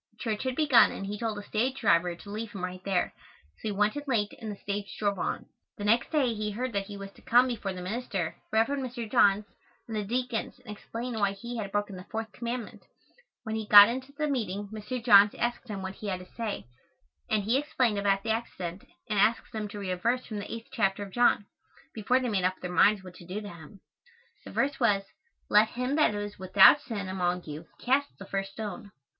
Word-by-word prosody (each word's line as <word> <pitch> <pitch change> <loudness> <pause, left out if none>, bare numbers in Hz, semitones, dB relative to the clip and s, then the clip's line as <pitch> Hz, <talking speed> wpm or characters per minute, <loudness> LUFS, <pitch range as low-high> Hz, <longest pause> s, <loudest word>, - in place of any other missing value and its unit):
Church 220 -3 -2
had 260 -1 -1
begun 270 -8 +6
and 195 - -5
he 205 +1 -5
told 225 -3 -2
the 205 - -6
stage 250 +6 -1
driver 175 -4 +3
to 200 - -13
leave 215 +1 -5
him 195 -3 -6
right 185 0 -5
there, 190 -2 0 0.4
so - - -6
he - - 0
went 210 +3 +1
in 290 - -3
late 210 -5 0
and 220 -2 -5
the - - -6
stage 200 0 -5
drove 200 -2 0
on. - - -2 0.3
The 205 - -6
next 230 +3 +3
day 275 -7 +2
he 210 -1 -3
heard 240 +4 -3
that 200 -1 -1
he 205 -1 -7
was 195 0 -8
to - - -20
come 245 +2 +5
before 215 -5 -3
the 180 -1 -6
minister, 195 -4 -3 0.2
Rev. 220 +1 +4
Mr. 255 -4 -3
Johns, 205 0 +4 0.4
and 225 - -5
the 210 - -1
deacons 245 +2 -2
and 210 - -7
explain 235 +4 -6
why 200 -1 +2
he 235 +4 -7
had 200 -3 -4
broken 205 -1 -1
the 180 - -10
fourth 220 -1 -4
commandment. 235 0 -5 0.6
When 220 - -4
he 220 -1 -3
got 205 +1 +10
into 260 +3 -4
the 300 +2 -2
meeting 205 -7 -2
Mr. 220 +3 -5
Johns 205 -3 +7
asked 240 +1 -2
him 200 -3 -5
what 190 0 -4
he 210 - -8
had 185 -2 -2
to 180 - -15
say, 225 -3 -4 0.6
and 210 -2 +1
he 230 +6 +2
explained 255 -7 0
about 195 -1 +1
the 225 - 0
accident 195 -6 -4 0.2
and 210 -2 0
asked 220 +3 +2
them 215 -1 -3
to 205 - -9
read 195 -2 -3
a 180 - -1
verse 240 +7 0
from 215 -2 -5
the 205 - -5
8th 230 +1 -7
chapter 195 -1 0
of 195 - -9
John, 240 -4 +3 0.5
before 230 +4 +2
they 255 - -2
made 195 -4 0
up 185 +1 0
their 180 - -5
minds 200 +2 +4
what 185 -1 -10
to 175 - -13
do 190 +3 -4
to 210 - -8
him. 170 +2 -13 0.6
The - - -8
verse 275 0 0
was, 205 -5 +3 0.4
"Let 210 +1 +5
him 250 +3 -2
that 300 -9 +3
is 205 -1 -5
without 190 +9 +7
sin 210 -8 -5
among 180 -1 -1
you 155 +2 -8
cast 275 +3 +1
the 195 - -9
first 195 0 -3
stone." 210 -2 -6
210 Hz, 230 wpm, -29 LUFS, 195-235 Hz, 0.6 s, got